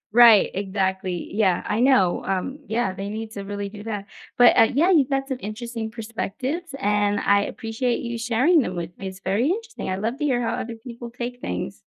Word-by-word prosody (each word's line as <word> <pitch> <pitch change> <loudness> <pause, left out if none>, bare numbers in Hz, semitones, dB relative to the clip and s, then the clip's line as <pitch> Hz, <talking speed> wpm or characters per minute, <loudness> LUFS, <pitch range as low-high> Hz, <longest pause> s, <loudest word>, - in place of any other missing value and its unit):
Right, 235 -4 +8
exactly, 190 -2 -2
yeah, 195 -4 +2
I 210 - 0
know, 240 -9 +3
um, 195 +10 -2
yeah, 220 -4 0
they 195 +1 -5
need 220 +1 -5
to 200 -2 -6
really 205 0 -4
do 205 0 -10
that. 205 -3 -4 0.3
But, 245 0 +7
uh, 225 -2 +6
yeah, 325 +8 +3
you've 290 -6 +4
got 270 0 0
some 265 -2 -3
interesting 225 +1 -5
perspectives, 245 - -4
and 205 -3 +1
I 200 0 +3
appreciate 235 +2 -2
you 235 -1 -4
sharing 250 +9 +3
them 185 -7 -3
with 175 0 -5
me. 195 - -5
It's 190 0 -9
very 200 +8 +1
interesting, 450 - -3
I 185 - 0
love 225 +6 -2
to - - -2
hear 255 -4 +2
how 230 - -1
other 230 0 -4
people 235 +1 -9
take 245 +1 -6
things. 90 -6 -4
225 Hz, 205 wpm, -23 LUFS, 200-245 Hz, 0.3 s, Right